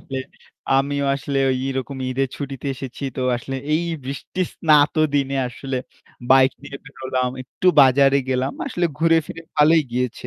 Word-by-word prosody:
আসলে। 135 - -6 0.6
আমিও 140 0 -1
আসলে 140 0 -2
ওই 130 - 0
এরকম 135 +1 -4
ঈদের 135 +1 0
ছুটিতে 140 -1 -6
এসেছি। 130 +1 -7
তো 130 - -2
আসলে 135 +3 -5 0.2
এই 170 +2 +1 0.2
বৃষ্টির 140 +7 -3
স্নাত 150 -2 +4 0.2
দিনে 140 -1 +1
আসলে 135 +2 -5 0.5
bike 130 0 +6
নিয়ে 140 0 -8
বের 135 - -15
হলাম। 130 -1 -1
একটু 160 +7 -5 0.2
বাজারে 135 +1 +5
গেলাম। 130 +1 0
আসলে 175 0 0
ঘুরে 165 0 +4
ফিরে 165 - -8
ভালোই 155 +2 +5
গিয়েছে 125 0 -2
135 Hz, 160 wpm, -21 LUFS, 130-145 Hz, 0.6 s, bike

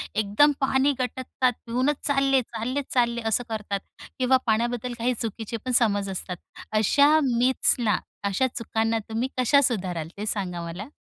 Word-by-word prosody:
एकदम 215 +8 +4
पाणी 270 +1 +3
गटकतात, 255 0 -1
पिऊनच 255 +5 0
चालले, 275 -1 +3
चालले, 250 +4 -3
चालले, 235 -1 +1
असं 225 +3 +1
करतात 210 -2 -3 0.4
किंवा 260 +1 +4
पाण्याबद्दल 240 +2 0
काही 245 +2 +1
चुकीचे 225 0 -4
पण 255 - -1
समज 205 -4 +1
असतात. 180 -1 -5 0.3
अशा 285 +8 +4
मिथ्सना, 245 -3 +2 0.3
अशा 200 +7 +1
चुकांना 225 0 0
तुम्ही 225 +3 -1
कशा 280 +3 +4
सुधाराल? 185 - -1
ते 210 - -4
सांगा 185 -5 -2
मला. 175 +7 -6
235 Hz, 140 wpm, -25 LUFS, 210-260 Hz, 0.4 s, एकदम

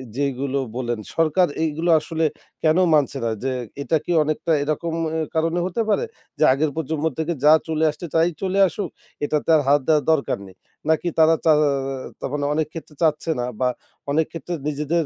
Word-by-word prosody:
যেইগুলো 140 0 -1 0.2
বললেন 120 -3 -2 0.2
সরকার 165 +3 +3 0.2
এইগুলো 160 +2 -1
আসলে 160 +1 -2 0.4
কেন 155 +2 +4 0.2
মানছে 145 -4 +2
না - - +1
যে, 135 - 0 0.3
এটা 160 +2 +1
কি 175 - -2
অনেকটা 155 +2 -2
এরকম 160 +2 -2 0.2
অ্যা 160 0 -1
কারণে 165 +2 +1
হতে 190 +5 -1
পারে? 470 - +2 0.3
যে, - - +2
আগের 145 +2 0
প্রজন্ম 160 0 -2
থেকে 160 +2 -1
যা 155 - +8
চলে 160 0 0
আসছে 150 +3 -6
তাই 165 +2 +4
চলে 195 +1 0
আসুক 180 -1 -4 0.4
এটাতে 150 +2 -1
আর 150 - +4
হাত 145 +1 +5
দেওয়ার 150 -3 +4
দরকার 155 -3 +1
নেই? 95 - -15 0.3
নাকি 160 +2 +2
তারা 160 +1 +6
চা 160 - +6
অ - - +3 0.5
তা - - -5
মানে 145 -1 -1
অনেক 155 -1 0
ক্ষেত্রে 160 -2 -9
চাচ্ছে 160 0 +1
না 120 - -1
বা 130 - +2 0.4
অনেক 160 +2 +2
ক্ষেত্রে 170 +1 -6
নিজেদের 150 +2 0
155 Hz, 185 wpm, -22 LUFS, 145-165 Hz, 0.5 s, যা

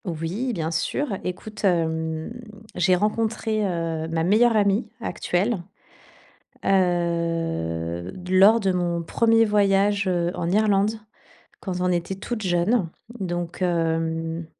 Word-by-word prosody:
Oui, 175 +9 -3
bien 165 -4 -2
sûr. 205 - -1
Écoute, 210 +4 -6
hem, 160 -1 0 0.4
j'ai 180 +1 +3
rencontré, 215 +2 0
heu, 165 -3 -2
ma 165 0 -1
meilleure 220 +5 +4
amie 200 +2 +2
actuelle, 195 -2 -1 1.0
heu, 165 - 0 0.2
lors 195 +5 +6
de 195 -3 +1
mon 175 -1 -1
premier 225 +6 +3
voyage, 200 -1 +2
heu, 175 -1 0
en 170 - -2
Irlande. 210 +1 +2 0.6
Quand 185 -3 -4
on 180 - +1
était 175 +2 -1
toutes 215 +3 -5
jeunes 180 +2 +1 0.3
donc 175 -2 -4
hem 165 -1 -1
180 Hz, 115 wpm, -24 LUFS, 165-210 Hz, 1.0 s, lors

